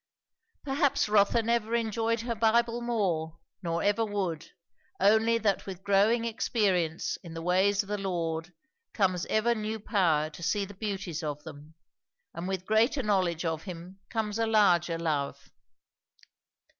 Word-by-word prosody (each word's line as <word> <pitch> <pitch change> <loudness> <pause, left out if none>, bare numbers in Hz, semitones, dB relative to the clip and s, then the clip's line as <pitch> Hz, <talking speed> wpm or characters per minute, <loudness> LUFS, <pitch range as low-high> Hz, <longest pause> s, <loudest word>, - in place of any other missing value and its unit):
Perhaps 280 0 +1
Rotha 210 +2 +3
never 230 0 0
enjoyed 230 0 0
her 235 0 -2
Bible 230 +1 +2
more, 180 -9 -1 0.2
nor 170 -2 -2
ever 205 +2 +2
would, 195 -7 -3 0.5
only 220 +4 +4
that 205 -4 0
with 190 -1 -7
growing 205 +4 +3
experience 195 -7 0
in 165 -2 -9
the 165 - -5
ways 190 +3 +2
of 200 - -15
the 210 0 -2
Lord 170 -3 -3 0.4
comes 185 -3 +1
ever 225 +2 +2
new 220 0 -3
power 165 -8 +1
to 165 - -12
see 200 +4 0
the 205 - -11
beauties 195 -5 -4
of 150 -2 -4
them, 150 +3 -12 0.6
and 170 +2 -5
with 190 -1 -3
greater 230 +6 +2
knowledge 185 -5 +1
of 160 -1 -2
him 180 +1 -9
comes 220 -1 -2
a 225 - +1
larger 180 -6 +3
love. 150 -4 -3
200 Hz, 145 wpm, -29 LUFS, 170-220 Hz, 0.6 s, only